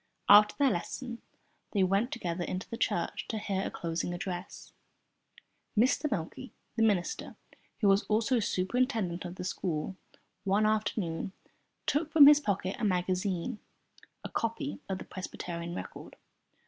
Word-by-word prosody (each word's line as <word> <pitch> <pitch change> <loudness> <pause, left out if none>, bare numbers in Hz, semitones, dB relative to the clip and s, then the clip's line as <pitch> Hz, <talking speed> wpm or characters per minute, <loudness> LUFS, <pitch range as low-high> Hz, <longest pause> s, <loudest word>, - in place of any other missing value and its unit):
After 210 +1 +8
their 280 -3 +4
lesson 235 +7 -4 0.5
they 200 -3 +3
went 195 +6 +2
together 175 -6 -3
into 185 +1 -4
the - - -5
church - - -1
to 220 - -3
hear 195 -2 -1
a - - -2
closing 170 +1 -3
address. 180 0 -6 1.0
Mr. 265 +6 +3
Meikle, 210 +5 -4 0.3
the 230 - 0
minister, 205 -6 +1 0.5
who 205 - +4
was 195 +1 +5
also 230 +4 +2
superintendent 200 -2 0
of 175 0 -6
the 180 - -6
school, 180 -1 -2 0.5
one 200 +2 +2
afternoon 205 -5 -1 0.5
took 310 +1 0
from 305 -3 +9
his 295 +1 +9
pocket 195 -7 -1
a - - -4
magazine 185 +2 0 0.6
(a - - -5
copy 230 +6 -2
of 190 - -1
the - - -8
"Presbyterian 170 -2 -6
Record"). - - -8
200 Hz, 140 wpm, -31 LUFS, 180-230 Hz, 1.0 s, from